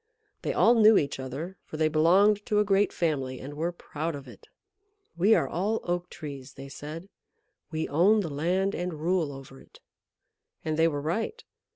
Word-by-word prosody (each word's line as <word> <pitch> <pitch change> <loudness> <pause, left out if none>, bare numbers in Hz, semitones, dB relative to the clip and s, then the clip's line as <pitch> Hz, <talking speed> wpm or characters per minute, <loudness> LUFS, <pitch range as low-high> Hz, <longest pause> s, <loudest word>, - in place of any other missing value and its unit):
They - - -1
all 235 - +5
knew 220 -2 +6
each 140 -2 -1
other, 145 +8 -6
for 155 - -8
they 155 0 +3
belonged 190 +7 +4
to 210 - +1
a 210 - +5
great 200 0 +3
family, 135 -6 -1
and 140 +2 -8
were 165 +4 -2
proud 165 -2 -5
of 140 -2 -9
it. 120 - -14 0.7
"We 195 +6 +4
are - - +1
all 205 +6 -1
Oak 175 0 -2
Trees," 140 -4 -8
they 135 0 -9
said. 150 +6 -8 0.6
"We 160 0 -2
own 195 +9 +4
the 165 -6 -4
land, 185 +7 0
and 175 -1 -3
rule 165 -2 0
over 135 -1 -11
it." - - -19 0.9
And 155 -1 0
they 160 +1 +4
were 145 -3 -2
right. 225 - -3
165 Hz, 185 wpm, -27 LUFS, 145-195 Hz, 0.9 s, knew